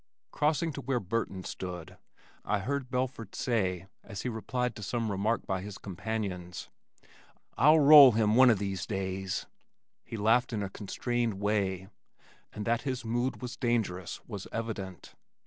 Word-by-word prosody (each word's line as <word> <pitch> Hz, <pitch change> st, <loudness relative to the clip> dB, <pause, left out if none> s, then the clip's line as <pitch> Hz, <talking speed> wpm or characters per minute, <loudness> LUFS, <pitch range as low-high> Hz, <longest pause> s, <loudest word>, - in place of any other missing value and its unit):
Crossing 155 Hz, +2 st, +1 dB
to 140 Hz, -, -6 dB
where 130 Hz, -1 st, 0 dB
Burton 95 Hz, -2 st, -3 dB
stood, 90 Hz, -3 st, -6 dB, 0.5 s
I 105 Hz, -, 0 dB
heard 130 Hz, +5 st, -3 dB
Belford 125 Hz, -4 st, -3 dB
say 95 Hz, -7 st, 0 dB, 0.2 s
as 100 Hz, -4 st, -7 dB
he 125 Hz, -, -1 dB
replied 125 Hz, +1 st, -2 dB
to -, -, -8 dB
some 115 Hz, +2 st, -2 dB
remark 105 Hz, +3 st, 0 dB
by 95 Hz, -1 st, -2 dB
his 100 Hz, 0 st, -7 dB
companions, 95 Hz, -3 st, -5 dB, 0.8 s
"I'll 150 Hz, +6 st, +6 dB
roll 145 Hz, -3 st, +10 dB
him 110 Hz, -1 st, +2 dB
one 130 Hz, +2 st, +7 dB
o' 115 Hz, -, +5 dB
these 100 Hz, -1 st, -3 dB
days." 95 Hz, -2 st, -3 dB, 0.6 s
He 115 Hz, -, -7 dB
laughed 115 Hz, +4 st, +3 dB
in 105 Hz, -2 st, -1 dB
a 95 Hz, -, -5 dB
constrained 120 Hz, +3 st, -2 dB
way, 95 Hz, -2 st, -1 dB, 0.6 s
and 105 Hz, -, -6 dB
that 115 Hz, +1 st, +1 dB
his 130 Hz, -3 st, -3 dB
mood 120 Hz, +3 st, -1 dB
was 125 Hz, -, -5 dB
dangerous 110 Hz, -8 st, -1 dB
was 100 Hz, -5 st, -7 dB
evident. 100 Hz, -6 st, -5 dB
110 Hz, 150 wpm, -30 LUFS, 95-125 Hz, 0.8 s, roll